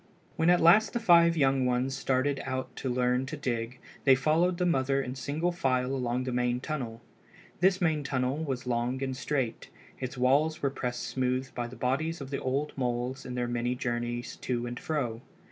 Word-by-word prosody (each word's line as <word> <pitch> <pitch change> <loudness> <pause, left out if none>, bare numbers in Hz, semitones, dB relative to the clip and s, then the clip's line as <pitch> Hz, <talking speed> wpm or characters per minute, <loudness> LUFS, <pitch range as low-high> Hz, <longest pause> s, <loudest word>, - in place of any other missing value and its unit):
When 160 +1 +2
at 175 0 +5
last 195 +6 +6
the 235 - 0
five 170 -5 +5
young 135 -2 +3
ones 125 +2 0
started 135 +2 0
out 130 -1 -4
to 130 - -3
learn 125 +1 +1
to 155 - -5
dig 120 -2 -3 0.3
they 135 -2 +7
followed 160 +6 +2
the 180 - +1
mother 135 -4 +2
in 130 -2 -3
single 145 +7 -1
file 130 -6 0
along 125 -1 -1
the 130 - -3
main 125 0 0
tunnel. 125 -5 -4 0.6
This 185 +1 +4
main 160 -4 +1
tunnel 130 0 -1
was 135 -6 -3
long 125 +2 -1
and 130 -1 -2
straight. 130 -3 -2 0.3
Its 130 0 -5
walls 145 +6 +2
were 140 - +2
pressed 125 -2 -3
smooth 130 0 -1
by 120 -1 -3
the 125 - -10
bodies 155 +6 -1
of 135 -1 -8
the 140 - -1
old 140 +3 -1
moles 125 +1 -2
in 125 - -5
their 120 -1 -1
many 120 +1 -1
journeys 120 -1 -3
to 120 -1 -2
and 120 0 -5
fro. 125 -7 -2
130 Hz, 195 wpm, -29 LUFS, 125-150 Hz, 0.6 s, they